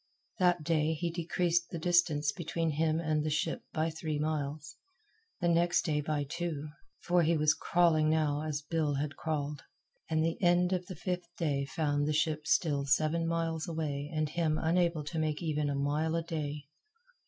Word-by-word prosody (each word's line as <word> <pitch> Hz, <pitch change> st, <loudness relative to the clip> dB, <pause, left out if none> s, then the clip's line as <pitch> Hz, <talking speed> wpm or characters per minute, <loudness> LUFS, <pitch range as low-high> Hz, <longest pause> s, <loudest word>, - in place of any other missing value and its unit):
That 175 Hz, -3 st, +3 dB
day 160 Hz, -1 st, +1 dB
he 170 Hz, +2 st, -2 dB
decreased 170 Hz, 0 st, 0 dB
the 170 Hz, -, -5 dB
distance 160 Hz, -4 st, +2 dB
between 165 Hz, -1 st, -2 dB
him 155 Hz, +1 st, +1 dB
and 155 Hz, -2 st, 0 dB
the 155 Hz, -, -1 dB
ship 155 Hz, -, -1 dB
by 160 Hz, +1 st, 0 dB
three 160 Hz, -1 st, -3 dB
miles; 150 Hz, 0 st, -3 dB, 0.7 s
the 175 Hz, -, +2 dB
next 170 Hz, +1 st, +3 dB
day 150 Hz, -2 st, 0 dB
by 150 Hz, -1 st, -1 dB
two 155 Hz, 0 st, -4 dB, 0.3 s
for 175 Hz, 0 st, +3 dB
he 165 Hz, 0 st, +3 dB
was 150 Hz, 0 st, +4 dB
crawling 165 Hz, -3 st, +3 dB
now 150 Hz, -2 st, +1 dB
as 155 Hz, -1 st, -3 dB
Bill 150 Hz, -2 st, 0 dB
had 145 Hz, +1 st, -2 dB
crawled; 150 Hz, -2 st, -3 dB, 0.5 s
and 160 Hz, 0 st, +2 dB
the 165 Hz, +3 st, -2 dB
end 175 Hz, 0 st, +3 dB
of 180 Hz, -1 st, -2 dB
the 185 Hz, -, -6 dB
fifth 180 Hz, -2 st, -3 dB
day 140 Hz, -5 st, 0 dB
found 145 Hz, -1 st, 0 dB
the 155 Hz, -, +1 dB
ship 155 Hz, -1 st, 0 dB
still 145 Hz, -3 st, +2 dB
seven 155 Hz, +4 st, +2 dB
miles 165 Hz, 0 st, -1 dB
away 150 Hz, -3 st, -3 dB
and 155 Hz, -2 st, -1 dB
him 155 Hz, -1 st, 0 dB
unable 170 Hz, -1 st, +1 dB
to 160 Hz, +2 st, -4 dB
make 155 Hz, +1 st, -1 dB
even 150 Hz, -2 st, 0 dB
a 140 Hz, -, -1 dB
mile 150 Hz, +3 st, 0 dB
a 165 Hz, -, 0 dB
day. 150 Hz, -3 st, -4 dB
155 Hz, 180 wpm, -31 LUFS, 150-170 Hz, 0.7 s, was